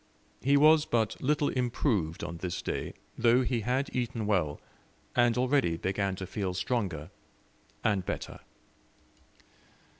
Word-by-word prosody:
He 140 +2 +4
was 155 +1 +6
but 115 -3 0
little 145 +1 +2
improved 115 - 0
on 85 - -5
this 90 0 -4
day, - - -3 0.3
though 120 +2 +5
he 125 -1 0
had 125 +5 -1
eaten 120 -3 -1
well, 85 -8 0 0.6
and 120 -1 +4
already 125 - +2
began 95 +2 -1
to 95 - -5
feel 95 -1 -3
stronger 90 - -2 0.7
and 100 -4 +2
better. - - -5
115 Hz, 125 wpm, -30 LUFS, 95-125 Hz, 0.7 s, was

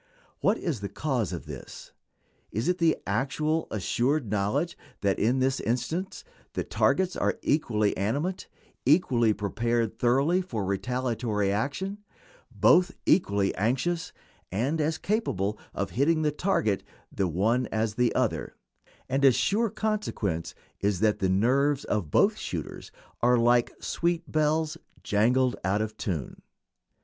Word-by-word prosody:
What 210 +3 +2
is 155 - -2
the 100 - -4
cause 125 - -1
of 85 - -6
this? - - -9 0.6
It - - -7
is 155 +11 +1
the 165 -2 +3
actual, 140 +9 0
assured 120 - 0
knowledge 120 +12 0 0.3
that 100 -1 +1
in 120 +5 +2
this 130 +1 +1
instance 160 - -2 0.3
the - - -1
targets 185 -1 +1
are - - 0
equally 110 -9 +1
animate, 145 - -2 0.4
equally 125 -6 +4
prepared 115 +2 -1
thoroughly 140 +9 +3
for 115 - -4
retaliatory 115 0 -1
action, 145 - -2 0.5
both 180 +2 +4
equally 100 - +3
anxious, 135 - -1 0.4
and 135 - 0
as 155 +1 0
capable 105 - -1
of 100 - -3
hitting 155 +5 +2
the 150 - +2
target 145 - 0 0.3
the 95 - 0
one 110 +9 +1
as 110 0 -1
the 125 +1 +2
other, - - -1 0.5
and 135 +2 0
a 135 - +8
sure 215 - +1
consequence 205 - -2 0.2
is 100 -3 0
that 105 -1 +2
the 95 - +1
nerves 135 +9 +2
of 100 -8 -1
both - - +3
shooters - - -6 0.3
are 125 +1 +4
"like 120 0 +3
sweet 170 -1 -1
bells, 155 +1 +1 0.2
jangled, 125 +5 +2
out 95 +3 +1
of 110 0 -3
tune." 85 -10 -4
125 Hz, 135 wpm, -27 LUFS, 105-155 Hz, 0.6 s, a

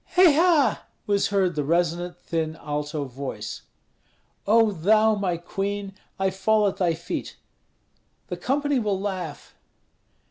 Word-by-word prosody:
"Hei 360 -2 +8
ha!" 320 -3 +3 0.2
was 200 -1 +2
heard 195 -3 +1
the 150 -2 -1
resonant, 175 +3 0
thin 160 -2 -3
alto 150 -1 -4
voice. 135 +1 -6 0.9
"O 225 +1 +5
thou, 215 +5 +3
my 190 -4 -1
queen! 195 +3 -4 0.2
I 190 0 +1
fall 210 +3 +2
at 195 - -2
thy 175 -3 +1
feet." 165 - -5 0.9
"The - - -5
company 285 0 0
will 205 -4 -1
laugh." 185 -7 -5
190 Hz, 130 wpm, -25 LUFS, 165-215 Hz, 0.9 s, Hei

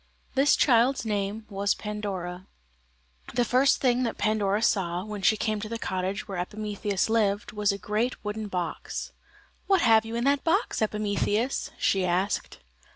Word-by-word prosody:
This 275 +2 +4
child's 245 0 +3
name 210 0 -2
was 200 0 0
Pandora. 190 -4 -5 0.9
The 245 - +3
first 255 +4 +3
thing 250 -1 +3
that 235 -3 -1
Pandora 210 0 +1
saw, 180 -4 +1
when 210 -2 -6
she 215 +3 +4
came 215 0 -1
to 215 - -5
the 230 - -3
cottage 190 -1 -3
where 195 -3 -4
Epimetheus 205 0 -2
lived, 210 -2 +1
was 210 -1 +1
a 200 - -3
great 215 +4 -2
wooden 210 +1 -3
box. 180 -4 -4 0.6
"What 390 -3 +4
have 225 -2 +5
you 225 +1 -6
in 235 - -1
that 280 +1 +2
box, 355 - +1
Epimetheus?" 210 +3 0
she 195 -1 +2
asked. 180 +3 -1
210 Hz, 155 wpm, -27 LUFS, 195-230 Hz, 0.9 s, have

